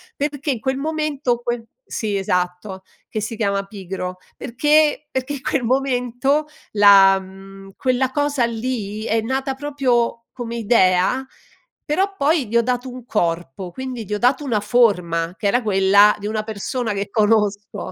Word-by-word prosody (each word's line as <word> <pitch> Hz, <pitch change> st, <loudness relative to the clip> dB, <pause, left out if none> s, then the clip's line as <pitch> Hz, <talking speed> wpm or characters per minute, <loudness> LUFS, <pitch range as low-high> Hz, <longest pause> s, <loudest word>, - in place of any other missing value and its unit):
perché 290 Hz, 0 st, -2 dB
in 250 Hz, -, -3 dB
quel 265 Hz, +4 st, -1 dB
momento, 295 Hz, -4 st, -1 dB
que 240 Hz, -1 st, -3 dB, 0.2 s
Sì, 210 Hz, -3 st, -2 dB
esatto, 180 Hz, +1 st, -2 dB, 0.3 s
che 215 Hz, -, -4 dB
si 220 Hz, +2 st, -4 dB
chiama 200 Hz, -3 st, 0 dB
"Pigro," 185 Hz, -2 st, -6 dB, 0.2 s
perché 295 Hz, +4 st, +2 dB
perché 265 Hz, +2 st, -3 dB
quel 275 Hz, -1 st, 0 dB
momento 260 Hz, +3 st, 0 dB, 0.2 s
la 200 Hz, -2 st, +7 dB
mhmm, 195 Hz, +1 st, -13 dB
quella 255 Hz, 0 st, +1 dB
cosa 290 Hz, -1 st, 0 dB
lì 225 Hz, -3 st, -4 dB
è 225 Hz, 0 st, 0 dB
nata 265 Hz, +4 st, -2 dB
proprio 260 Hz, -5 st, 0 dB
come 235 Hz, -2 st, -6 dB
idea, 200 Hz, +1 st, +3 dB, 0.6 s
però 385 Hz, +6 st, 0 dB
poi 285 Hz, -2 st, +2 dB
gli 230 Hz, +3 st, +1 dB
ho 235 Hz, -, +4 dB
dato 250 Hz, +1 st, -2 dB
un 250 Hz, -1 st, -10 dB
corpo, 175 Hz, -, -2 dB
quindi 255 Hz, +4 st, -6 dB
gli 210 Hz, 0 st, -3 dB
ho -, -, -1 dB
dato 250 Hz, +6 st, +2 dB
una 225 Hz, -7 st, 0 dB
forma, 180 Hz, -7 st, +1 dB
che 215 Hz, -, -7 dB
era 245 Hz, +5 st, +3 dB
quella 200 Hz, 0 st, +5 dB
di 205 Hz, -, -9 dB
una 215 Hz, +1 st, -1 dB
persona 220 Hz, +2 st, -3 dB
che 200 Hz, 0 st, -4 dB
conosco. 210 Hz, -2 st, 0 dB
230 Hz, 155 wpm, -20 LUFS, 200-265 Hz, 0.6 s, la